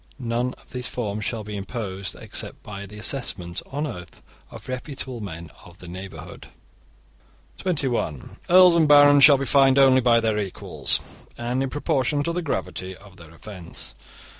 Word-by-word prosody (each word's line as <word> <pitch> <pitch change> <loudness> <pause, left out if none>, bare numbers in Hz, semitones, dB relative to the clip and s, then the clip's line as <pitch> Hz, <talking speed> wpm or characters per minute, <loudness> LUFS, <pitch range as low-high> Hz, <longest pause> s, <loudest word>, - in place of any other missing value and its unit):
None 120 0 -2
of - - -23
these 125 0 -2
fines 105 -3 -4
shall 115 -3 -3
be 105 0 -7
imposed 100 -2 -4
except - - -5
by 100 -1 -8
the 105 +2 -12
assessment 100 -7 -2
on 145 +3 -3
oath 90 - -8 0.3
of - - -12
reputable 130 -1 -5
men 85 -5 -7
of 90 0 -15
the 90 - -12
neighbourhood. 95 +2 -9 1.1
(21) 130 - -2
Earls 180 -1 +7
and 160 -2 +4
barons 145 -1 +7
shall 140 -2 +9
be 135 - -3
fined 135 0 +4
only 130 -1 +6
by 120 -1 +4
their 110 -2 0
equals, 100 -3 -3
and 120 +2 -2
in 135 - -1
proportion 145 +1 0
to 170 - -2
the 180 - -2
gravity 95 - -4
of 100 -1 -17
their 85 -2 -13
offence. 90 +1 -7
120 Hz, 165 wpm, -24 LUFS, 95-135 Hz, 1.1 s, shall